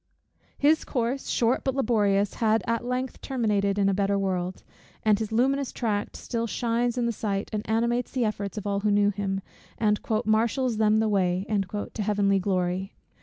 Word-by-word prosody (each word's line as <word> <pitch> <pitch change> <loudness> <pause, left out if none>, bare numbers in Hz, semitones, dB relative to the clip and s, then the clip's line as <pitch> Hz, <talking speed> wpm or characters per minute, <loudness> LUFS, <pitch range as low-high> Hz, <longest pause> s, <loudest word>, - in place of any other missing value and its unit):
His 305 +2 +3
course, 250 +1 -2
short 235 +1 +1
but 265 -1 -1
laborious, 205 -6 +2
has 220 -1 +2
at 230 0 -1
length 250 +1 -3
terminated 210 -6 0
in 200 -1 +3
a 195 - +3
better 200 +1 +1
world; 185 -2 -2 0.4
and 215 -1 +3
his 220 -1 -3
luminous 265 +4 +1
tract 210 -4 -2
still 230 -1 -3
shines 240 +1 0
in 245 - +1
the 235 - +1
sight, 200 -2 -3
and 210 - -1
animates 235 +2 +1
the 255 -3 0
efforts 210 -1 -3
of 210 - -4
all 200 -1 0
who 210 +1 0
knew 205 0 +3
him, 195 -1 -2 0.4
and 210 -2 +2 0.3
"marshals 230 +2 +1
them 215 0 +3
the 220 - +1
way" 185 -2 +1 0.5
to - - -3
Heavenly 200 -1 +2
glory. 185 0 -1
215 Hz, 175 wpm, -26 LUFS, 200-235 Hz, 0.5 s, His